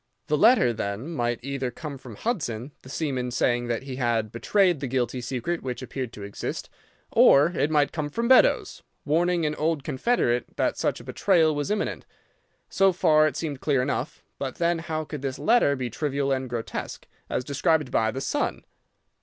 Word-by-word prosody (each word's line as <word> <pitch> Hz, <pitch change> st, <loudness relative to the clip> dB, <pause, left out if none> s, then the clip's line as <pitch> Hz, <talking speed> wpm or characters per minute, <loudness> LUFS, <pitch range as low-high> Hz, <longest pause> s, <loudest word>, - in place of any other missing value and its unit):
The 150 Hz, -, +1 dB
letter, 205 Hz, -, +5 dB
then, 110 Hz, +7 st, -4 dB
might 120 Hz, -6 st, -1 dB
either 135 Hz, -1 st, -2 dB
come 140 Hz, +2 st, -7 dB
from 125 Hz, -4 st, -10 dB
Hudson, 140 Hz, -, -3 dB
the 130 Hz, -, -13 dB
seaman, 135 Hz, -4 st, -2 dB
saying 120 Hz, 0 st, 0 dB
that 120 Hz, +1 st, -2 dB
he 135 Hz, -2 st, -6 dB
had 115 Hz, -4 st, 0 dB
betrayed 180 Hz, -, +2 dB
the 135 Hz, -, -3 dB
guilty 125 Hz, 0 st, -1 dB
secret 130 Hz, +8 st, -3 dB
which 130 Hz, 0 st, -5 dB
appeared 130 Hz, -2 st, -5 dB
to 105 Hz, -, -9 dB
exist, 100 Hz, 0 st, -5 dB, 0.4 s
or 145 Hz, +5 st, +6 dB
it 155 Hz, -4 st, 0 dB
might 150 Hz, -2 st, +2 dB
come 150 Hz, -3 st, -3 dB
from 230 Hz, +10 st, -2 dB
Beddoes, 260 Hz, +1 st, +4 dB, 0.2 s
warning 170 Hz, +2 st, +2 dB
an 150 Hz, -, 0 dB
old 155 Hz, -1 st, -1 dB
confederate 130 Hz, -, 0 dB
that -, -, +1 dB
such -, -, -1 dB
a -, -, -11 dB
betrayal 165 Hz, -5 st, +2 dB
was 145 Hz, -1 st, -2 dB
imminent. 210 Hz, 0 st, -2 dB, 0.6 s
So 195 Hz, 0 st, +3 dB
far 155 Hz, -3 st, +4 dB
it 155 Hz, -, -3 dB
seemed 145 Hz, -5 st, -4 dB
clear 135 Hz, -4 st, +2 dB
enough. 140 Hz, +1 st, -3 dB, 0.2 s
But 135 Hz, -2 st, -4 dB
then 170 Hz, 0 st, +1 dB
how 155 Hz, -1 st, -3 dB
could 150 Hz, -2 st, -7 dB
this 135 Hz, -1 st, -3 dB
letter 225 Hz, -11 st, +3 dB
be 125 Hz, -3 st, -4 dB
trivial 140 Hz, +1 st, -1 dB
and 130 Hz, -1 st, -1 dB
grotesque, 120 Hz, -2 st, -5 dB, 0.2 s
as -, -, -1 dB
described 150 Hz, +1 st, +1 dB
by 110 Hz, -1 st, +2 dB
the 130 Hz, +4 st, -4 dB
son? 290 Hz, -, -2 dB
140 Hz, 185 wpm, -25 LUFS, 125-160 Hz, 0.6 s, or